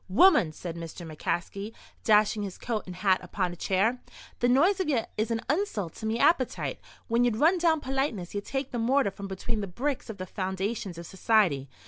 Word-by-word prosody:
"Woman!" 200 - +5
said 170 +1 -7
Mr. 170 +1 -7
McCaskey, 190 +6 -3 0.3
dashing 210 0 +4
his 195 -3 -5
coat 220 -5 -3
and 180 - -7
hat 190 0 +3
upon 185 -3 -2
a - - -8
chair, 200 +8 +1 0.4
"the 245 - +3
noise 345 +10 +4
of 370 -5 0
ye 245 -6 +2
is 215 +2 -1
an 225 -1 -1
insult 270 - -1
to 220 - -4
me 220 +1 0
appetite. 260 -2 +2 0.3
When 235 +1 +2
ye 245 - +4
run 315 - +3
down 325 -3 +3
politeness 265 -9 -2
ye 205 - -2
take 270 +5 -4
the 240 - -2
mortar 245 -1 +2
from 200 +1 -7
between 195 +3 -3
the 200 - -3
bricks 255 +8 -3
of 220 - -6
the 185 - -5
foundations 190 0 -3
of 170 - -7
society. 185 - +2
215 Hz, 200 wpm, -28 LUFS, 185-255 Hz, 0.4 s, Woman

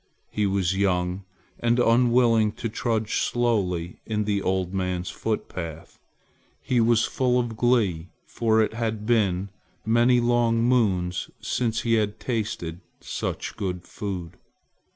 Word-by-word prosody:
He 105 -1 0
was 95 -1 +1
young 95 -1 0 0.3
and 120 0 +2
unwilling 115 -2 +4
to - - -4
trudge 110 -1 -1
slowly 95 -8 0
in 105 -1 -1
the 100 -1 0
old 95 -1 -1
man's 90 -1 -2
footpath. 85 -7 -5 0.6
He 125 -2 +1
was 115 0 +3
full 125 -1 +1
of 120 -2 -2
glee, 105 -9 +1 0.2
for 110 -1 +2
it 110 - -2
had 110 -2 -3
been 100 -5 +1 0.4
many 120 +2 +4
long 120 -1 +2
moons 95 -8 +1
since 115 -2 -1
he 115 - +1
had 105 +1 -3
tasted 100 -8 -3 0.2
such - - -4
good 90 -2 -3
food. 90 -6 -6
110 Hz, 130 wpm, -25 LUFS, 95-120 Hz, 0.6 s, unwilling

